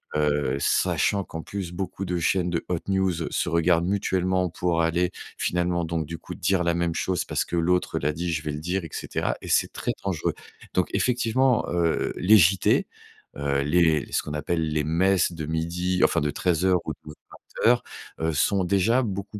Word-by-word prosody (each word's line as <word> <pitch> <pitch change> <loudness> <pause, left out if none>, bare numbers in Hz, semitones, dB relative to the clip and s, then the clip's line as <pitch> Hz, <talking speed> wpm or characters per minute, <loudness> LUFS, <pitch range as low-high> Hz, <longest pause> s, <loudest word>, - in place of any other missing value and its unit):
Heu 75 -3 +1
sachant 100 +7 +1
qu'en 80 -2 -7
plus, 95 -4 -5
beaucoup 95 +2 -4
de 90 -1 -2
chaînes 90 +2 +1
de 85 -1 -2
hot 90 -2 0
news, 95 -1 +1 0.2
se - - -1
regardent 85 0 +2
mutuellement. 95 -2 0
Pour 85 0 0
aller 85 +2 +1 0.3
finalement 90 -1 0
donc 80 -1 -2
du 85 +1 -6
coup - - -9
dire 90 +1 +1
la 85 0 +1
même 85 -1 -1
chose, 95 -2 -1
parce - - -1
que - - -4
l'autre 90 +2 +1
l'a 75 +2 0
dit, 85 +2 -3
je 80 -2 -1
vais 75 - -3
le 75 - -5
dire, 90 +4 -2
et 80 - -7
cetera, - - -2
et - - -9
c'est - - +2
très - - -2
dangereux. 95 -5 -1 0.4
Donc - - +1
effectivement, 125 0 +2
heu, 85 -2 0
les 105 +4 +6
JT, 95 +1 +3 0.5
heu, 70 -1 0
les 80 +1 +3
les - - -18
ce - - +1
qu'on 75 - -6
appelle 80 +2 -1
les 75 0 0
messes 90 +4 +2
de 80 -2 -5
midi, 85 +3 -1
enfin - - +3
de 75 0 0
13:00 90 +3 +1
ou - - -3
de - - -20
20:00 115 +9 -1 0.5
sont 95 +7 +2
déjà, 100 +7 +2
beaucoup 100 -1 -5
85 Hz, 190 wpm, -25 LUFS, 80-95 Hz, 0.5 s, les